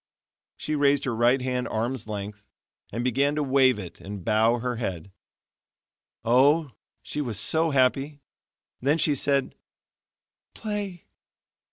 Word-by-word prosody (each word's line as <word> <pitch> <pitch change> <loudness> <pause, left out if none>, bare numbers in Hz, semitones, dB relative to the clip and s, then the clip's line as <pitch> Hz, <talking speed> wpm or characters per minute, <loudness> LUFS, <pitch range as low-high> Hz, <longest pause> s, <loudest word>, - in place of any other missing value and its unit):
She 155 - -4
raised 145 -1 +2
her 125 -4 -1
right 120 +3 +3
hand 125 -1 -2
arm's 115 +1 -3
length, 105 -1 -6 0.5
and 115 +3 -3
began 135 +4 +1
to 150 - 0
wave 130 -2 +4
it 95 -5 -9
and 100 -2 -8
bow 110 +2 +3
her 125 0 -3
head. 95 -5 -4 1.1
Oh! 140 +5 +4 0.3
she 150 - -4
was 115 -7 -2
so 160 +7 +3
happy. 140 +1 +1 0.6
Then 140 +5 +2
she 155 -2 +2
said: 140 0 0 1.0
"Play." 205 -5 -5
130 Hz, 130 wpm, -26 LUFS, 115-145 Hz, 1.1 s, wave